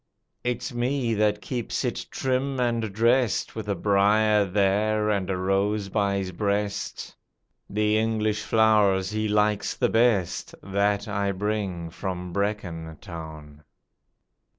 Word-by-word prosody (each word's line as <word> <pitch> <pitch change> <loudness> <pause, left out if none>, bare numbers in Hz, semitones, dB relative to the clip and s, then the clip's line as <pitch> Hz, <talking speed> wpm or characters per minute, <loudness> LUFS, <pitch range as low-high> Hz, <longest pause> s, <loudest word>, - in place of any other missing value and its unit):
It's 125 +2 -2
me 120 0 0
that 105 -1 +1
keeps 120 -4 -3
it - - -3
trim 130 +1 -1
and 115 -3 0
drest 115 +3 +2
With 110 -2 -5
a 100 - +1
briar 105 +2 +3
there 105 +3 +1
and 100 -2 -1
a 95 - 0
rose 100 +2 0
by 100 -1 +1
his 95 -1 -3
breast 100 +1 -2 0.5
The 105 +1 +2
English 110 -1 0
flowers 105 -4 +3
he 110 0 -1
likes 105 0 +1
the - - +1
best 115 -6 +1
That 100 +2 0
I 100 -1 0
bring 95 -4 -3
from 90 -1 -5
Brecon 90 -6 -3
Town. 75 -2 -10
105 Hz, 130 wpm, -25 LUFS, 95-110 Hz, 0.5 s, briar